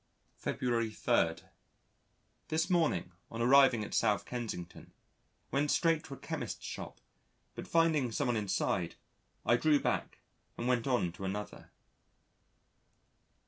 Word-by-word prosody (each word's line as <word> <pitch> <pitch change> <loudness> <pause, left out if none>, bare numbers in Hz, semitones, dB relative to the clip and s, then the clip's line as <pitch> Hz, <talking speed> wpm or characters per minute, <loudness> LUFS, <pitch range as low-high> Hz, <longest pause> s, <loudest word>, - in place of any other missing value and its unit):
February 115 -3 0
3. 85 -6 +1 1.1
This 160 +4 0
morning 155 - +1 0.2
on 115 - -7
arriving 125 -2 +5
at - - -7
S. 105 -4 +2
Kensington, 115 -8 -6 0.6
went 140 +2 +1
straight 165 0 +2
to 140 - -7
a - - -15
Chemist's - - -5
shop, - - -7 0.5
but - - -8
finding 160 -7 +2
someone 125 -1 0
inside, 95 -4 -1 0.5
I 120 - +4
drew 150 +2 +4
back, - - -1 0.4
and 120 - -2
went 125 0 +1
on 120 -10 +1
to 90 +3 -10
another. 100 +2 -5
120 Hz, 120 wpm, -32 LUFS, 105-145 Hz, 1.1 s, arriving